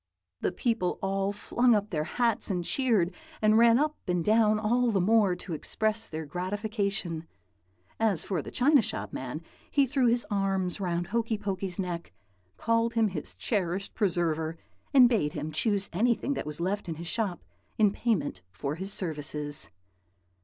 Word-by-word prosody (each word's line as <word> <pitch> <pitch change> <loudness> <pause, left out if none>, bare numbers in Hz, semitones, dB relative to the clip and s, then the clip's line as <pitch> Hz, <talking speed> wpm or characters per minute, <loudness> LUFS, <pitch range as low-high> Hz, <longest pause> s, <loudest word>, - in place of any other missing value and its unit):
"The - - 0
people 185 -1 0
all 195 +1 0
flung 235 +3 +2
up 205 0 -1
their 155 -3 -1
hats, 235 +3 0
and 180 -3 -1
cheered, 220 -9 +2 0.3
and 215 0 +4
ran 235 0 +6
up 300 +2 +1
and 180 -2 0
down 215 0 +4
all 240 +3 +2
the 205 -4 +2
more, 200 -1 +4
to 175 0 -7
express 220 +7 -1
their 160 0 -5
gratification. 195 -1 -2 0.7
As 215 -7 +2
for 180 -6 -2
the - - -8
china 280 +2 +4
shop - - -3
man, - - -5 0.3
he 280 -2 +3
threw 260 -1 +2
his 235 +1 +3
arms 195 -2 0
round 175 -2 -1
Hokey 225 +2 -1
Pokey's 195 -3 -3
neck, 175 - -4 0.4
called 230 +1 +1
him 225 -2 +3
his 170 -6 -6
cherished 195 -3 -2
preserver, 165 -5 0 0.3
and 260 -4 +8
bade 205 -12 +1
him 150 +1 -4
choose 200 +4 +1
anything 235 +7 +1
that 150 - -4
was 150 +1 -4
left 190 +2 -2
in 165 - -3
his 170 +2 -7
shop 200 -1 -2 0.3
in 210 -2 +4
payment 185 - -1
for 100 +10 -3
his 190 +5 -5
services. 150 - -2
200 Hz, 165 wpm, -28 LUFS, 175-225 Hz, 0.7 s, and